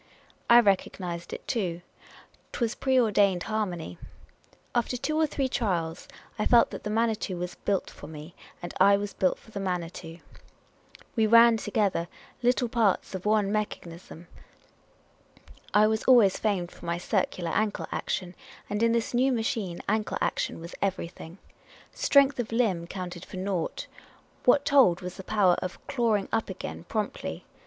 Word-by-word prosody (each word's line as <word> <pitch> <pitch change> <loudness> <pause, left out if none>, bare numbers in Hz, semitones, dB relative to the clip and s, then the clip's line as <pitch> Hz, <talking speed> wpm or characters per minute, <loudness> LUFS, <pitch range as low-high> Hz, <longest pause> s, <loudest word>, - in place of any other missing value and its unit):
I 240 0 +9
recognised 185 -4 -1
it - - -8
too. 175 -8 -2 0.7
'T - - -5
was 235 -2 0
a - - -18
pre 265 -1 +2
ordained 200 -6 +3
harmony. 180 - -3 0.7
After 245 +1 0
two 310 +5 -2
or 315 0 +3
three 275 -2 -1
trials 175 -9 -2 0.3
I 210 - +1
felt 235 -1 +5
that - - -6
the 210 - -3
Manitou 220 -3 0
was 175 0 -4
built 200 -2 -2
for 145 - -11
me, 155 +2 -10 0.3
and 175 - -6
I 200 +1 +6
was 205 0 -4
built 185 - +1
for 220 - -19
the 205 - -5
Manitou. 175 -3 -4 1.0
We 220 -2 +3
ran 230 +1 +7
together 205 -5 0 0.3
like 245 -1 +1
parts 220 -6 +1
of 190 +2 -4
one 210 -2 +2
mechanism. 175 -5 -5 1.5
I 210 +1 +5
was 220 0 0
always 235 -7 +6
famed 190 -5 -1
for - - -12
my 170 0 0
circular 180 -2 -1
ankle 215 -1 0
action; 180 -1 -3 0.4
and 210 +1 -1
in 230 0 +3
this 235 +1 -1
new 255 +3 +3
machine, 225 -7 -2
ankle 215 0 0
action - - -1
was 170 +1 -9
everything. 180 -3 -4 0.6
Strength 280 -1 +4
of 230 -2 -3
limb 205 -8 +1
counted 180 -1 -6
for - - -9
naught; 185 -3 -2 0.6
what 280 +3 +5
told 245 -11 +5
was 180 0 -7
the 190 - -8
power 195 -3 +3
of 185 -1 -5
"clawing 230 -7 0
up 225 -2 0
again" 185 -2 -7
promptly. 210 +2 -4
205 Hz, 160 wpm, -27 LUFS, 180-230 Hz, 1.5 s, I